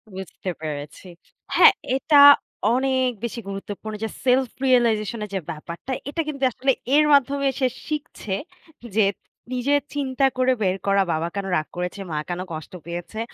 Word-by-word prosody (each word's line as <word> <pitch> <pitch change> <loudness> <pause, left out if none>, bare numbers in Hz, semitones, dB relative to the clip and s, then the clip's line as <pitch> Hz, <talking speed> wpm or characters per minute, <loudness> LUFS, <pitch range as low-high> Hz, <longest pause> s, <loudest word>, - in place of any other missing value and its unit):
বুঝতে 190 0 -6
পেরেছি। 150 +3 -6 0.5
হ্যাঁ, 425 - +8 0.2
এটা 285 +2 +5 0.5
অনেক 260 0 +1
বেশি 235 0 -3
গুরুত্বপূর্ণ 205 +2 -6
যে, 220 - -1 0.2
সেলফ 255 -1 +3 0.2
রিয়ালাইজেশন 230 -3 +2
এর 210 - -13
যে - - +1
ব্যাপারটা, 170 +10 -8 0.2
এটা 330 +3 -1
কিন্তু 275 -3 -4
আসলে 270 +3 +1 0.2
এর 300 0 +5
মাধ্যমে 280 0 +3
সে 260 - +3 0.2
শিখছে, 290 -10 -4 0.6
যে 215 -3 +5 0.5
নিজে 255 +3 0 0.2
চিন্তা 270 -1 0
করে 255 0 +3
বের 190 -1 +1
করা, 200 0 +4
"বাবা 160 +2 -1
কেন 200 -1 -2
রাগ 155 - -1
করেছে? 180 +3 -4
মা 155 - -2
কেন 175 - -3
কষ্ট 155 +3 -8
পেয়েছে? 175 +5 -6
225 Hz, 155 wpm, -23 LUFS, 185-265 Hz, 0.6 s, হ্যাঁ